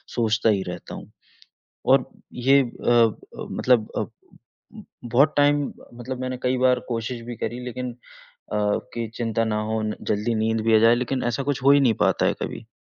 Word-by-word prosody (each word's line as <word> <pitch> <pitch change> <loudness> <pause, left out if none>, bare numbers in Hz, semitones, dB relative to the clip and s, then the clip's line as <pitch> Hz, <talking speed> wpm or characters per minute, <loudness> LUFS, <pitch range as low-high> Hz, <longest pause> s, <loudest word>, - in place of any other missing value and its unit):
सोचता 115 -1 +2
ही 100 -3 +1
रहता - - -7
हूँ। - - -11 0.8
और - - +5 0.3
ये 135 +3 +4
अ 120 0 -3
अ, 115 -2 +4 0.3
मतलब 120 -4 +2
अ, - - 0 1.0
बहुत 135 +6 +3
टाइम 145 0 +4
ब - - -17
मतलब 130 +1 -5
मैंने 130 0 -3
कई 130 0 +1
बार 125 0 +3
कोशिश 115 0 -3
भी 120 -1 -6
करी 120 +1 -4
लेकिन 125 0 -4 0.4
अ, 105 - -8 0.4
कि 115 -1 -2
चिंता 115 -1 0
ना 105 -1 -1
हो 110 0 0
न 110 0 -2 0.2
जल्दी 105 +3 0
नींद 110 +1 0
भी 110 -1 +5
आ - - +6
जाए, 115 +2 +6
लेकिन 125 +1 -2
ऐसा 135 - -2
कुछ 140 -1 -2
हो 140 - +6
ही 140 - +5
नहीं 120 -5 +3
पाता - - +2
है - - +1
कभी। - - -6
120 Hz, 190 wpm, -24 LUFS, 115-130 Hz, 1.0 s, आ